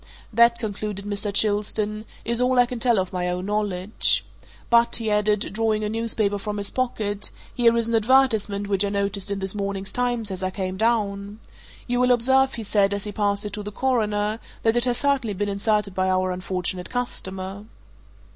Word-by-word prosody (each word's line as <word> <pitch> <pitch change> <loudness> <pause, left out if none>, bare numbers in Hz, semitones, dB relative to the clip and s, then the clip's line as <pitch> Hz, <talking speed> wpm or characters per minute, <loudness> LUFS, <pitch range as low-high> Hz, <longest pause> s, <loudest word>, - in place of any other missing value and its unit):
That," 235 +1 +5
concluded 210 -3 -4
Mr. 205 0 -2
Chilstone, 210 +1 0 0.2
"is 235 +1 0
all 255 0 +2
I 245 - +6
can 245 0 -6
tell 240 -1 +3
of 190 0 -1
my 180 -1 -1
own 180 +1 -3
knowledge. 205 -1 +1 0.5
But," 235 0 +4
he 225 -2 +3
added, 210 0 +1
drawing 215 0 0
a 210 - -1
newspaper 215 -2 0
from 210 +1 -4
his 200 -1 0
pocket, 215 -5 -1 0.2
"here 235 -1 +3
is 230 -1 +1
an 230 - -2
advertisement 220 -4 +2
which 200 -1 +1
I 200 - 0
noticed 200 -1 -2
in 200 - -2
this 190 -1 -2
morning's 195 -1 -3
Times 240 -4 -1
as 190 0 -3
I 185 - 0
came 185 -1 -4
down. 205 -1 -1 0.5
You 245 0 -1
will 250 0 +4
observe," 265 +2 +3
he 230 - -5
said, 200 -1 +2
as 200 - -4
he 210 - -5
passed 205 0 0
it 205 - -5
to 210 - -4
the 210 0 -6
Coroner, 215 -3 0 0.2
"that 225 0 +3
it 240 0 +2
has 245 -1 +1
certainly 265 -6 0
been 205 +2 -2
inserted 205 0 0
by 185 0 0
our 185 0 +1
unfortunate 180 0 -2
customer." 195 -5 -4
210 Hz, 195 wpm, -24 LUFS, 200-230 Hz, 0.5 s, I